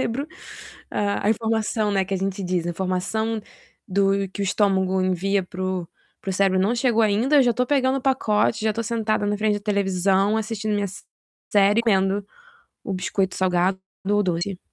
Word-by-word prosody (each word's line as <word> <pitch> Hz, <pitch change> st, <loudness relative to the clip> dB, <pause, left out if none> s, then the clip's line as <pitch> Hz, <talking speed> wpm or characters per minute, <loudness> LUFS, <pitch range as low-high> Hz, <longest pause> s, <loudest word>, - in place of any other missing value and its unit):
cérebro, 260 Hz, +5 st, -2 dB, 0.6 s
a 200 Hz, 0 st, -1 dB
a -, -, +4 dB
informação, 220 Hz, -1 st, 0 dB
né, 195 Hz, -1 st, +1 dB
que 195 Hz, +1 st, -3 dB
a -, -, +1 dB
gente 195 Hz, +1 st, -3 dB
diz, 180 Hz, -2 st, -1 dB
a -, -, 0 dB
informação 190 Hz, +5 st, -2 dB, 0.5 s
do 195 Hz, +1 st, +2 dB, 0.2 s
que 205 Hz, -, -5 dB
o -, -, +1 dB
estômago 190 Hz, -1 st, +1 dB
envia 190 Hz, +2 st, +1 dB
para 185 Hz, 0 st, -7 dB
o 185 Hz, -2 st, -2 dB, 0.3 s
para 195 Hz, -, -4 dB
o -, -, -1 dB
cérebro 190 Hz, 0 st, +2 dB
não 205 Hz, +6 st, +2 dB
chegou 235 Hz, -2 st, +2 dB
ainda, 220 Hz, +8 st, +3 dB
eu 275 Hz, -, +7 dB
já 240 Hz, -1 st, +3 dB
estou 250 Hz, +2 st, 0 dB
pegando 270 Hz, -1 st, +2 dB
o -, -, -9 dB
pacote, 220 Hz, -5 st, +1 dB
eu -, -, 0 dB
já -, -, +3 dB
estou 230 Hz, +2 st, -2 dB
sentada 220 Hz, -2 st, -1 dB
na 205 Hz, -, 0 dB
frente 215 Hz, -1 st, +2 dB
da 205 Hz, -, -3 dB
televisão, 195 Hz, 0 st, +1 dB
assistindo 215 Hz, -1 st, -2 dB
minha 205 Hz, 0 st, 0 dB, 0.7 s
série, 205 Hz, +2 st, +4 dB
comendo 195 Hz, -2 st, +1 dB, 0.6 s
o 200 Hz, -, -3 dB
biscoito 190 Hz, 0 st, -1 dB
salgado 185 Hz, 0 st, +1 dB, 0.3 s
ou 205 Hz, 0 st, +3 dB
doce. 180 Hz, +1 st, -2 dB
200 Hz, 190 wpm, -23 LUFS, 190-220 Hz, 0.7 s, eu